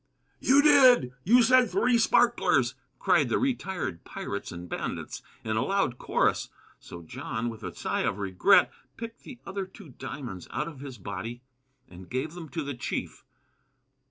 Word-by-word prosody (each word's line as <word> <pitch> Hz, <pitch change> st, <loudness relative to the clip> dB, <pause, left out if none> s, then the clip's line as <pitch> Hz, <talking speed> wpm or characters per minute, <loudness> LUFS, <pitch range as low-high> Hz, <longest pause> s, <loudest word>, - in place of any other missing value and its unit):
"You 280 Hz, +2 st, +5 dB
did! 260 Hz, -, +6 dB
You 240 Hz, +5 st, +6 dB
said 255 Hz, 0 st, +5 dB
three 235 Hz, +6 st, +2 dB
sparklers!" 240 Hz, +1 st, +3 dB, 0.2 s
cried -, -, +3 dB
the -, -, +2 dB
retired 190 Hz, -, -2 dB
pirates -, -, -6 dB
and 90 Hz, 0 st, -8 dB
bandits, -, -, -5 dB, 0.2 s
in 110 Hz, -1 st, -1 dB
a -, -, +2 dB
loud 195 Hz, -7 st, 0 dB
chorus. -, -, +1 dB, 0.3 s
So 85 Hz, -1 st, -10 dB
John, 110 Hz, +8 st, -4 dB
with 115 Hz, -1 st, -9 dB
a -, -, -5 dB
sigh -, -, -2 dB
of -, -, -1 dB
regret, 95 Hz, -3 st, +4 dB, 0.3 s
picked 230 Hz, 0 st, -8 dB
the 260 Hz, -, -11 dB
other 195 Hz, -1 st, -4 dB
two 190 Hz, -3 st, -14 dB
diamonds 125 Hz, -, -7 dB
out 150 Hz, -, -3 dB
of 155 Hz, -5 st, -9 dB
his 135 Hz, -3 st, -8 dB
body 105 Hz, +5 st, -6 dB, 0.4 s
and 90 Hz, 0 st, -13 dB
gave 135 Hz, +5 st, -3 dB
them 170 Hz, -3 st, -9 dB
to 165 Hz, -3 st, -3 dB
the 140 Hz, 0 st, -4 dB
chief. 120 Hz, -, -5 dB
150 Hz, 160 wpm, -28 LUFS, -, 0.4 s, did